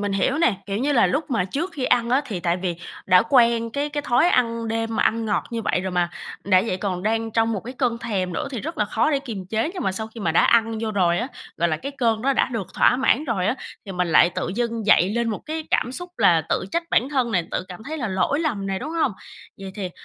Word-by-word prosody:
mình 205 -1 -1
hiểu 260 +9 +1
nè, 320 -10 +3
kiểu, 200 -1 -2
như 285 +4 +1
là 240 - +4
lúc 295 +2 -2
mà 230 -7 +1
trước 290 - -3
khi 275 -6 -3
ăn 240 -1 +2
á 260 +3 +4
thì 195 -8 -4
tại 170 0 +1
vì 180 -2 -2 0.3
đã 180 -1 +6
quen 235 -3 +4
cái 285 +5 -2
cái 295 0 -3
thói 260 +7 +3
ăn 230 -4 +1
đêm 225 0 -2
mà - - +2
ăn 225 0 +1
ngọt 205 -2 0
như 230 -1 -3
vậy 185 - 0
rồi 190 0 -3
mà, 175 -1 +1 0.3
đã 185 -1 +4
vậy 185 - -1
còn 185 -2 -3
đang 225 +2 0
trong 225 +1 +1
một 205 - -2
cái 250 +3 -7
cơn 245 -3 0
thèm 195 -6 -2
nữa 170 - -3
thì 250 -5 -4
rất 325 +5 -6
là - - +3
khó 220 +7 +1
để 280 - +2
kiềm 220 -9 -7
chế 225 - -1
nhưng 365 - -4
mà 190 - 0
sau 220 +3 -4
khi 225 +1 -11
mà 170 -5 0
đã 165 - +4
ăn 225 -1 +3
vô 225 -1 -2
rồi 175 -4 +2
á, 240 +4 -2 0.3
gọi 170 +1 +1
là, 155 - 0
cái 275 - -6
cơn 225 -3 +1
đó 275 +2 +2
đã - - +2
được 220 -6 -3
thỏa 245 - +4
mãn 265 +3 +2
rồi 200 -8 -1
á 235 - +1 0.3
thì 195 - -5
mình 180 -1 -1
lại 170 +2 +5
tự - - -2
dưng 230 -2 -2
dậy 190 -2 +5
lên 235 0 0
một 215 - -3
cái 315 0 -4
cảm 245 - +1
xúc 355 +5 -7
là 165 -2 +4
tự - - 0
trách 335 - +1
bản 250 - +2
thân 260 -5 0
nè, 180 -4 +2
tự - - -2
cảm 180 +3 -9
thấy 315 +2 -5
là 245 - -2
lỗi 190 +10 0
lầm 230 -12 -2
nè, 195 -1 -2
đúng 285 +8 -6
hông? 320 -8 0 0.5
Vậy 195 -1 -8
thì 190 -4 -4
225 Hz, 285 wpm, -23 LUFS, 190-255 Hz, 0.5 s, đã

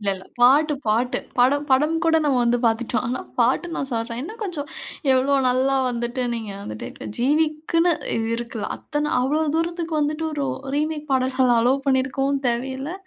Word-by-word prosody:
இல்ல 205 - -3
இல்ல. 190 0 -11 0.2
பாட்டு 290 +5 +5
பாட்டு. 230 +4 +1 0.2
படம் 285 +4 +3
படம் 300 +5 +3
கூட 325 -1 +4
நம்ம 280 -3 +2
வந்து 240 0 +2
பாத்துட்டோம். 225 +2 0
ஆனா 250 +2 -2 0.2
பாட்டு 250 +8 +2
நான் 275 - -3
சொல்றேன். 230 +1 -3
இன்னும் 435 +9 -8
கொஞ்சம் 315 -8 -4 0.4
எவ்ளோ 265 +2 +3
நல்லா 265 +2 +2
வந்துட்டு 240 +1 -2
நீங்க 220 -3 -5
வந்துட்டு 110 - -7
இப்போ - - -9
ஜீவிக்குன்னு 310 +5 +2 0.2
இது 225 0 -1
இருக்குலாம். 235 -2 -4
அத்தன 295 0 -3
அவ்ளோ 290 +5 +1 0.2
தூரத்துக்கு 335 -1 -2
வந்துட்டு, 300 +2 -1
ஒரு 285 - 0 0.3
ரீமேக் 300 0 -2
பாடல்கள் 255 -1 +2
அலோவ் 265 +4 +2
பண்ணியிருக்கவும் 270 +1 +1
தேவையில்ல. 265 +5 -3
265 Hz, 160 wpm, -23 LUFS, 240-300 Hz, 0.4 s, பாட்டு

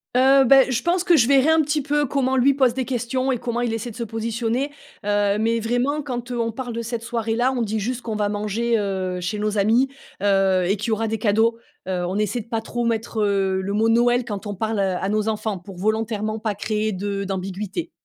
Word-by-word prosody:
Heu, 265 +1 +6
bah, 270 +1 +6
je 250 -1 0
pense 350 +1 +1
que 345 -3 +5
je 230 - +4
verrai 275 +2 +4
un 320 0 +5
petit 295 0 0
peu 295 +2 +1
comment 265 -1 0
lui 275 +2 +4
pose 260 -3 +3
des 260 0 -2
questions 255 +1 -1
et 245 - -1
comment 235 0 -3
il 240 -2 -1
essaie 225 +2 -4
de - - -13
se 235 - -3
positionner. 230 +4 -2 0.3
Heu, 205 0 +2
mais 230 +1 +1
vraiment, 245 +6 0
quand 250 -3 -5
on 230 -1 -1
parle 250 0 -5
de 235 - -3
cette 230 0 -4
soirée-là, 230 +2 0
on 250 - -2
dit 220 -1 -1
juste 245 +3 -3
qu'on 225 -2 -4
va 205 -1 0
manger, 215 +3 0
heu, 190 -2 -2
chez 180 +4 -3
nos 210 0 -1
amis, 230 +7 +3 0.3
heu, 195 -2 +3
et 200 - +2
qu'il 215 +4 -3
y - - 0
aura 220 +1 0
des 225 - -1
cadeaux. 220 +2 +2 0.3
Heu, 180 -1 -1
on 185 - -3
essaie 210 +3 0
de 225 - -9
pas 225 -1 -2
trop 240 +2 -3
mettre, 225 -1 -1
heu, 195 -2 +1
le 200 +2 -3
mot 220 +2 +2
Noël 240 +2 +3
quand 205 -3 -6
on 205 - -4
parle 220 +2 -2
à 190 0 0
nos 215 0 0
enfants 215 -2 -2
pour 185 +2 -11
volontairement 215 +1 -1
pas 215 -1 -2
créer 215 +1 -1
de 200 +1 -3
d'ambiguïté. 195 - -4
225 Hz, 235 wpm, -22 LUFS, 205-245 Hz, 0.3 s, Heu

